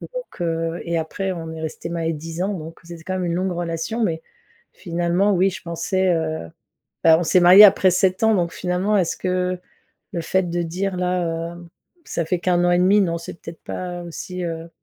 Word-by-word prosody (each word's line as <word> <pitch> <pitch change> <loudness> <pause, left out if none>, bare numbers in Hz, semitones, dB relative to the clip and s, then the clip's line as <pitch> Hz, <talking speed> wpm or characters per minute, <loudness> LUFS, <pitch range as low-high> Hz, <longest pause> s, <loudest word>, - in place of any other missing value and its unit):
Donc, - - -8
heu, 165 0 -2
et 170 -1 -1
après 190 +4 -3
on 165 -2 -6
est 160 - -7
restés 160 +1 -5
mariés 165 -1 -1
10 165 +3 -5
ans. 200 +1 -1
Donc 165 -1 -8
c'est 170 0 -9
c'est 160 - -15
quand 185 - -3
même 185 -1 -2
une 170 - -1
longue 185 +1 -1
relation 170 +6 -3
mais, 165 -6 -1 0.5
finalement, 175 +3 0
oui 190 +1 +3
je 185 - -9
pensais, 185 +3 -1
heu, 160 - -3 0.6
bah, 160 0 +7
on - - -1
s'est 180 - +4
mariés 180 +4 +10
après 190 -2 +6
7 185 +2 +1
ans, 220 - +4
donc 170 -3 0
finalement, 185 +4 0
est-ce 180 -4 +1
que 185 0 -1 0.5
le 170 - -3
fait 185 +3 +1
de 175 0 -1
dire 185 +3 -3
là, 170 -2 -1
heu, 175 0 -12 0.4
ça 170 - -2
fait 175 +2 -1
qu' 180 - -2
1 175 0 +3
an 175 - +3
et 175 - +4
demi, 195 +3 +5
non, 170 -3 0
c'est 165 - -8
peut-être 165 0 -10
pas 180 -1 -5
aussi, 180 +2 -6
heu, 165 0 -5
175 Hz, 220 wpm, -22 LUFS, 165-185 Hz, 0.6 s, mariés